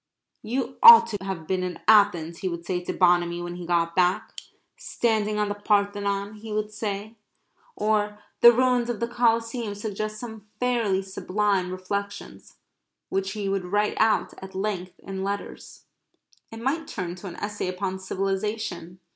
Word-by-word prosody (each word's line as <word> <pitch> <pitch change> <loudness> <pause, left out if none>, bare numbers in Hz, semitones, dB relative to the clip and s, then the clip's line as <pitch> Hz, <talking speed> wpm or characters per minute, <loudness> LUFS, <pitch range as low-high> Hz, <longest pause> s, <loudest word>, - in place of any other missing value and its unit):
"You 250 +4 -3
ought 465 -1 +11
to 205 - -2
have 190 -4 -5
been 185 +2 -1
in 180 -2 -4
Athens," 200 -6 +4
he 190 - -2
would 170 -1 -5
say 180 0 -1
to - - -2
Bonamy 175 -1 +2
when 175 0 -6
he 175 -1 -7
got 170 -1 +1
back. 180 0 +1 0.4
"Standing 220 - -1
on 210 0 +1
the 205 - -1
Parthenon," 205 0 0
he 215 +1 -9
would 210 0 -2
say, 210 +1 -5 0.6
or 210 -1 0 0.2
"The 235 - +10
ruins 250 0 +2
of 235 -4 -2
the 235 - -1
Coliseum 230 -2 0
suggest 215 +1 -4
some 220 -3 -9
fairly 230 -6 +1
sublime 195 -1 -1
reflections," 200 +2 -6 0.5
which 195 0 -1
he 205 -2 -3
would 195 -1 -1
write 205 +3 +1
out 220 0 +2
at 190 0 -10
length 190 -2 -3
in 190 -1 -5
letters. 200 +1 -6 0.7
It 225 0 -8
might 295 +6 -1
turn 180 -4 -4
to 195 - -8
an 175 - -7
essay 205 -2 -4
upon 185 +1 -3
civilization. 195 -1 -3
205 Hz, 160 wpm, -25 LUFS, 185-215 Hz, 0.7 s, ought